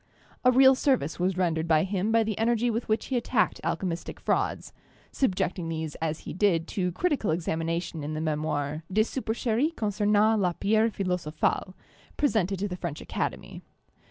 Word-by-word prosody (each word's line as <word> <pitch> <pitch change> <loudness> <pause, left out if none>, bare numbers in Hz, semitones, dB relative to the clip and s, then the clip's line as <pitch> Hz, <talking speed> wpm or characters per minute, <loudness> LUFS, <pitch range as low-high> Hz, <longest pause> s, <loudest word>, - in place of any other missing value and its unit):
A 255 - +6
real 265 +1 +7
service 255 - 0
was 185 +1 0
rendered 165 -3 0
by 155 -1 +4
him 195 +2 -1
by 225 0 +4
the 215 -1 -2
energy 235 +1 +2
with 230 +1 -3
which 215 - +1
he 260 - -1
attacked 235 -2 0
alchemistic 170 -1 -3
frauds, - - -1 0.4
subjecting 185 -7 -1
these 160 -2 -3
as 160 -1 -2
he - - -7
did 175 -4 +2
to 180 -2 -1
critical 295 - 0
examination 165 0 -2
in 155 +1 -4
the - - -2
memoir 155 -1 -2
'Des 215 +3 +4
Su 260 +4 -4
percheries 235 +7 0
concernant 210 +1 +2
la 180 -3 +1
Pierre 220 +5 +2
Philosophale/ 180 -2 -1 0.4
presented 205 -9 +1
to 200 +3 -2
the 180 -2 -5
French 170 -4 -4
Academy. - - -4
190 Hz, 165 wpm, -27 LUFS, 165-220 Hz, 0.4 s, real